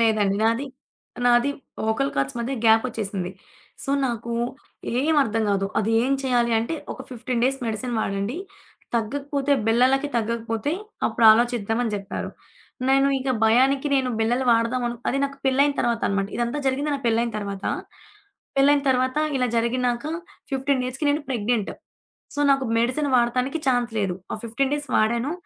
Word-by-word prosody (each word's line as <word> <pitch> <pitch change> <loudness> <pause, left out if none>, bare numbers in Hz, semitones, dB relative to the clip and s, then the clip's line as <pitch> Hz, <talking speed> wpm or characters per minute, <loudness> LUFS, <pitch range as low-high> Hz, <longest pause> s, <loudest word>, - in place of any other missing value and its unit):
లేదండి 215 -3 +2
నాది, 230 +5 +1 0.6
నాది 240 +3 +4 0.3
వోకల్ 220 +6 0
కార్డ్స్ 135 +9 -1
మధ్య 235 +3 -2
గ్యాపొచ్చేసింది. 220 -5 +1 0.5
సో, - - -3 0.2
నాకు 235 -1 -4 0.7
ఏమి 310 +2 +2
అర్థం 225 0 -1
గాదు. 195 -1 +1
అది 215 +1 0
ఏం 265 +3 +1
చేయాలి 240 -2 +2
అంటే, 230 +9 -2 0.2
ఒక - - -10
15 245 0 -2
డేస్ 270 +1 +1
మెడిసిన్ 235 +3 -3
వాడండి. 200 +7 -2 0.6
తగ్గకపోతే 280 +5 -1
బిల్లలకి 260 +5 +3
తగ్గకపోతే 230 +3 -1 0.3
అప్పుడు 230 - 0
ఆలోచిద్దామని 230 0 +2
జెప్పారు. 200 0 -4 0.6
నేను 270 +1 +4
ఇక 260 0 -1
భయానికి 265 +5 +3
నేను 260 -2 +1
బిల్లలు 240 +4 +1
వాడదామను 235 +1 +1
అది 275 - 0
నాకు 275 0 -5
పెళ్ళైయిన 275 +2 +3
తర్వాత 235 -1 0
అనమాట. 195 0 0
ఇదంతా 240 +4 -1
జరిగింది 280 +3 0
నాకు 275 -2 -4
పెళ్ళైయిన 230 +1 +1
తర్వాత. 200 -1 -5 0.9
పెళ్ళైయిన 280 +1 +4
తర్వాత 255 +1 +1 0.2
ఇలా 250 - +1
జరిగినాక 240 +2 0 0.5
15 270 0 +1
డేస్‌కి 260 +4 -3
నేను 290 +1 0
ప్రెగ్నెంట్. 230 -3 -1 0.6
సో, 290 - -2
నాకు 270 -1 +3
మెడిసిన్ 255 +6 +1
వాడతానికి 250 +5 +1
ఛాన్స్ 245 -2 +1
లేదు. 195 -3 0 0.2
ఆ - - -2
15 265 +5 -1
డేస్ 290 0 -4
వాడాను. 235 +6 +1
240 Hz, 145 wpm, -24 LUFS, 225-270 Hz, 0.9 s, నాది